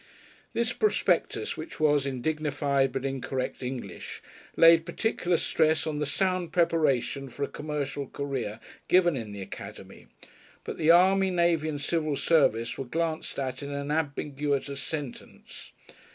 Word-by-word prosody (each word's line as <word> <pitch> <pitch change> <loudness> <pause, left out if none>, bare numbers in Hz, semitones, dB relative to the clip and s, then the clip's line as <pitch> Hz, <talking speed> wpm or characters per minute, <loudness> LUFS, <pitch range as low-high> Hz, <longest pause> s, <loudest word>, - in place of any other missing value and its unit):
This 235 +1 0
prospectus, 425 - +1
which 325 - -8
was 145 -2 +3
in 130 -3 -4
dignified 145 -3 +1
but 135 0 -3
incorrect 135 -1 -3
English, 125 -1 -6 0.3
laid 165 0 +7
particular 175 0 0
stress 160 -1 +2
on 150 -2 -2
the 150 - -1
sound 185 +2 0
preparation 145 -6 +1
for 140 - -5
a - - 0
commercial 145 -2 -4
career 130 -7 -4 0.3
given 175 -3 +4
in 115 -5 -5
the 100 -1 -6
Academy, - - -10 0.6
but - - -6
the 155 - +2
army, 190 +3 +6
navy 170 -3 +2
and 145 -2 -3
civil 155 -2 0
service 115 -7 +2
were 135 - -3
glanced 165 +4 -2
at 130 0 -3
in 140 - -5
an 140 0 -3
ambiguous 145 -2 -1 0.2
sentence. 145 -1 -8
150 Hz, 140 wpm, -28 LUFS, 135-165 Hz, 0.6 s, laid